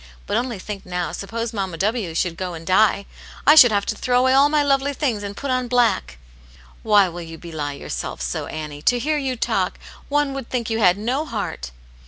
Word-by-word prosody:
But - - -2
only 245 -3 -1
think 195 +1 -7
now, 180 -1 -3
suppose 230 +3 -4
Mamma 190 -5 -3
W. 200 -3 -1
should 170 0 0
go 180 0 -4
and 165 0 -9
die! 200 +2 +3 0.4
I 295 - +8
should 255 -7 +9
have 200 -1 +1
to - - -1
throw 250 -1 +1
away 260 0 +3
all 275 +2 +5
my 300 -1 +2
lovely 280 0 +1
things, 250 -9 -1
and 200 0 -6
put 280 -2 -3
on 255 -1 0
black." 230 - +1 0.3
" - - -24 0.3
Why 205 -3 +5
will 175 0 -7
you 165 -1 -9
belie 155 -4 -5
yourself 140 - -5
so, - - -3
Annie? 150 -2 -6
To 245 - +3
hear 300 +5 0
you 265 -2 -2
talk, 235 - -1 0.3
one 290 -1 +1
would 270 -3 -6
think 235 -3 -2
you 225 - 0
had 185 -3 +4
no 250 +8 -1
heart." 225 - -5
215 Hz, 220 wpm, -22 LUFS, 180-255 Hz, 0.4 s, should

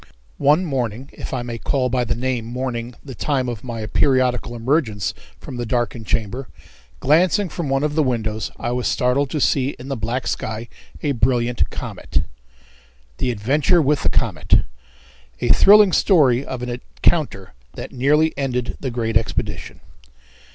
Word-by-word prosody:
One 150 +6 +4
morning, 130 -3 -3
if - - -7
I 125 -2 -2
may 120 -1 -5
call 130 +1 0
by 125 0 0
the - - -1
name 125 -1 -1
morning 120 -1 -4
the 135 - -7
time 130 0 -1
of 120 -4 -5
my 115 -3 -5
periodical 125 +1 +1
emergence 115 - 0 0.3
from 125 - -8
the 120 - -2
darkened 120 -2 -2
chamber, 115 +4 -2 0.5
glancing 180 +7 +3
from 160 -2 -4
one 135 +1 +1
of 150 -1 0
the 155 - +2
windows, 110 -5 -1
I 120 - -3
was 125 0 -1
startled 130 +3 +1
to 150 - -2
see 135 0 +1
in 130 +2 -9
the 135 - -1
black 115 +2 -2
sky 110 +1 -3 0.3
a 145 - +1
brilliant 120 -1 +1
comet. - - -3 1.0
The 125 - 0
Adventure 135 - +2
With 150 -1 +2
The - - +2
Comet. - - +2 0.8
A - - -1
Thrilling 205 -1 +7
Story 140 - +4
of 130 -3 -5
an 125 - -3
Encounter 120 - -1 0.2
that - - -7
Nearly 150 +5 +2
Ended 130 -3 -2
the 135 - -3
Great 115 -2 -2
Expedition. 100 -4 -2
125 Hz, 160 wpm, -21 LUFS, 120-140 Hz, 1.0 s, Thrilling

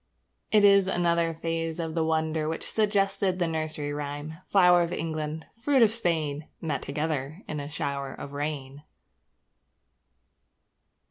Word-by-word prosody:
It 210 -1 +5
is 200 -1 +6
another 170 -2 +2
phase 165 0 -3
of 165 -1 -3
the 165 -1 +1
wonder 160 -1 0
which 160 - -4
suggested 200 -3 +1
the 175 - +1
nursery 155 -2 -2
rhyme: 145 +2 -5
Flour 180 -3 +6
of 170 0 -1
England, 160 -2 -3
fruit 265 0 +4
of 220 - +5
Spain, 160 -9 -1
Met 155 -4 -2
together 150 +3 -3
in 150 - -3
a 145 0 -5
shower 140 -3 -3
of 140 - -8
rain. 145 -1 -4
160 Hz, 135 wpm, -27 LUFS, 150-175 Hz, -, is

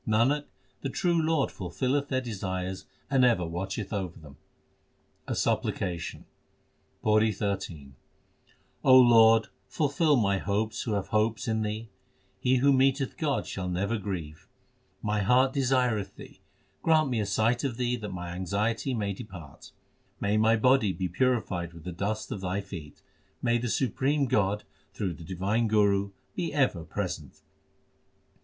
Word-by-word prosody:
Nanak, 125 +7 +2 0.4
the 135 - -2
true 170 +4 +1
Lord 160 -3 +1
fulfilleth 130 +9 -1
their 130 -2 0
desires 95 -5 -4 0.2
and 135 -2 +4
ever 115 -8 +3
watcheth 95 +5 -4
over 95 -4 -3
them. 75 -3 -13 0.9
A - - -2
supplication: 85 -3 -2 0.8
PAURI 110 0 +4
XIII 95 -8 -4 0.9
Lord, 115 -4 +7 0.2
fulfil 150 0 +2
my 100 -5 +2
hopes 105 +2 -1
who 110 - -2
have 100 -2 -2
hopes 110 +2 +1
in 110 -1 0
Thee. 110 +2 -3 0.5
He 130 +5 +2
who 140 +2 +4
meeteth 135 +1 +2
God 150 -5 -1
shall 90 -2 -4
never 100 +5 -1
grieve. 85 -7 -6 0.6
My 105 0 0
heart 130 +6 +4
desireth 125 -6 +1
Thee; - - -13 0.4
grant 155 -4 +3
me 120 - 0
a 105 - 0
sight 110 +5 +1
of 130 -5 -2
Thee 125 -1 0
that 105 -3 -6
my 90 -2 -6
anxiety 100 +8 -1
may 100 -3 -1
depart. 95 - -11 0.5
May 100 +1 +1
my 110 +1 +4
body 115 -2 +3
be 90 -1 -3
purified 95 -6 0
with 85 -2 -12
the 90 - -5
dust 105 +5 -3
of 100 - -4
Thy 95 +1 -1
feet! 95 -7 -9 0.4
May 120 -1 +2
the 120 0 -2
supreme 135 +4 +1
God 105 -5 +1 0.3
through 95 -4 -2
the 85 - -11
divine 95 +6 0
Guru 100 -2 +3 0.3
be 170 -3 -2
ever 130 - +1
present - - -5
110 Hz, 145 wpm, -28 LUFS, 95-130 Hz, 0.9 s, Lord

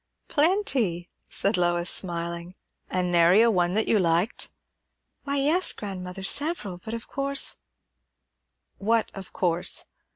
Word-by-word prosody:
"Plenty!" 280 - +1 0.2
said 200 +1 0
Lois, 175 0 +1
smiling. 170 0 -3 0.3
"An' 180 -1 -1
nary 175 +6 +5
one 180 -4 +1
that 220 - +1
you 215 - +3
liked?" 170 +4 0 0.8
"Why, 280 0 -1
yes, 310 +7 +3
grandmother; 190 -2 -7
several; 215 - 0
but 220 - -5
of 230 - -8
course 275 0 +1 0.6
" - - -54
"What 230 -1 +2
of 195 -2 -10
course?" 175 -1 +1
190 Hz, 125 wpm, -25 LUFS, 175-235 Hz, 0.8 s, nary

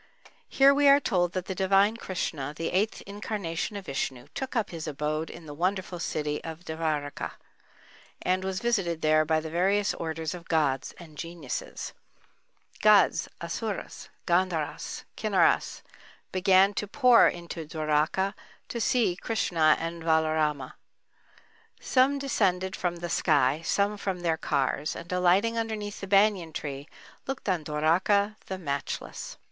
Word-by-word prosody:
Here 275 +1 +6
we 285 0 +4
are 280 +1 +7
told 175 -9 0
that 185 -1 -3
the 190 - -3
divine 195 +3 +3
Krishna, 155 -9 -4
the 165 +1 -3
eighth 200 +4 0
incarnation 200 -3 -4
of 200 -2 -6
Vishnu, 130 -4 -4
took 265 -1 -5
up 225 -4 0
his 165 -2 -6
abode 155 +2 -2
in 170 - -10
the 145 - -8
wonderful 185 +2 -2
city 150 -3 -2
Devârakâ, 160 -3 -3 0.9
and 185 +1 +1
was 190 0 -3
visited 195 -9 0
there 155 0 +4
by 160 0 +2
the 160 0 -6
various 195 +4 +2
orders 160 -1 -4
of 175 -2 -10
gods 140 -5 +1
and 155 -4 -13
geniuses. 165 -5 -5 0.9
Gods, - - +5
Asuras, - - -5 0.2
Gandharas, 175 -3 -1
Kinnaras - - +2 0.5
began 190 +1 +4
to 210 - -3
pour 250 +1 +6
into 170 -2 -5
Dwáraká, 155 +5 0 0.4
to 235 - -3
see 225 -6 +2
Krishna 175 -7 +2
and 165 0 -4
Valaráma. 155 -4 +1 1.1
Some 265 +2 +3
descended 190 -9 0
from 175 -1 -2
the 175 0 -5
sky, 145 -3 +2
some 200 +4 +1
from 190 -3 -3
their 165 -2 +1
cars—and 150 +4 -2
alighting 185 +6 +3
underneath 215 -2 -4
the 195 - -5
banyan 195 -4 +3
tree, 140 0 -5 0.4
looked 270 -4 -5
on 180 -5 +1
Dwáraká, 180 +8 +2
the 190 - -4
matchless. 140 -6 -5
175 Hz, 135 wpm, -28 LUFS, 155-200 Hz, 1.1 s, are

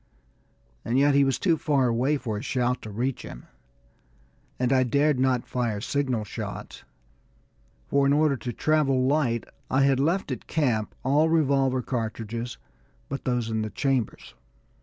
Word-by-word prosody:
And 120 +3 0
yet 140 +1 +4
he 140 0 +5
was 135 -1 +1
too 170 -5 +2
far 140 -5 +2
away 125 +6 +1
for 120 -5 -4
a 105 - -4
shout 125 0 -1
to 110 - -8
reach 120 +5 -2
him, - - -10 1.1
and 125 +1 +1
I 130 - +4
dared 140 +3 +2
not 130 -2 +1
fire 120 -4 -2
signal 130 -1 -1
shots, 105 - -7 1.0
for 140 0 +2
in - - +3
order 150 -1 +3
to 125 -1 -5
travel 135 -2 +2
light, 130 -5 +1 0.3
I 135 +1 +3
had 135 -1 +3
left 170 +7 0
at - - -5
camp 120 -9 0
all 145 +5 +3
revolver 135 -5 +2
cartridges 115 0 -4 0.5
but 140 - -5
those 125 -3 -1
in 110 0 0
the 110 - -3
chambers. 135 -2 -2
130 Hz, 160 wpm, -26 LUFS, 120-140 Hz, 1.1 s, he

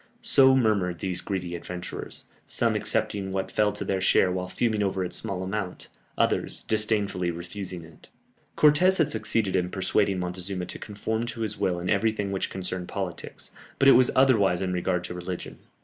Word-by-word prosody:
So 130 -1 +6
murmured 100 -8 +1
these 90 +1 -2
greedy 90 -3 -3
adventurers; 90 +1 -7 0.2
some - - +1
accepting 95 -2 -1
what 95 0 -3
fell 105 -1 +2
to 105 - -4
their 95 -1 -1
share 95 0 +4
while 90 0 -3
fuming 110 +2 0
over 95 -2 0
its 90 - -4
small 95 -4 -3
amount, 95 -1 -4 0.3
others - - +1
disdainfully 105 -4 0
refusing 85 +1 -6
it. 80 -1 -17 0.5
Cortès 170 +6 +5
had 160 - +2
succeeded 110 -2 0
in 90 -1 +1
persuading 100 +1 +1
Montezuma 90 +1 -3
to - - -6
conform 110 +2 -3
to 115 - -5
his 105 -2 -3
will 90 -2 0
in 90 - -5
everything 105 0 +1
which 95 - -2
concerned 90 -1 -4
politics, - - -5 0.3
but 135 - +4
it - - +10
was 125 -1 +6
otherwise 110 -9 +4
in 90 -1 -1
regard 90 0 -1
to 90 - -5
religion. 90 0 -6
95 Hz, 175 wpm, -26 LUFS, 90-110 Hz, 0.5 s, it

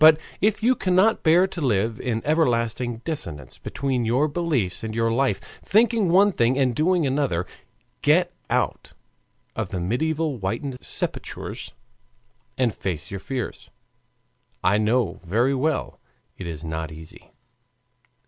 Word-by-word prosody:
But 155 0 +8 0.2
if 210 +2 +2
you 250 +3 +5
cannot 190 0 +3
bear 170 +3 +5
to 190 -3 -6
live 110 -4 +1
in 115 -3 -2
everlasting 120 -6 +1
dissonance 80 - -5
between 135 -3 -2
your 125 +7 +2
beliefs 145 - -1
and 110 -1 -4
your 115 0 +2
life, 135 +3 +1 0.2
thinking 220 -2 +3
one 195 +4 +5
thing 125 -5 +2
and 130 -4 +2
doing 170 +2 +2
another, 130 - 0 0.6
get - - +3 0.2
out - - -1 0.6
of 110 -4 -2
the 95 - -3
mediaeval 150 - 0
whited 120 +7 -3
sepulchers, - - -5 0.8
and 125 -4 +2
face 85 -6 -4
your 100 - -4
fears. 125 +3 -5 0.9
I 100 +3 +4
know 110 -4 +1
very 115 +10 +2
well 140 +2 -1 0.4
it 90 - -7
is 80 -2 -6
not 80 -1 -4
easy. 80 0 -12
125 Hz, 135 wpm, -24 LUFS, 105-160 Hz, 0.9 s, But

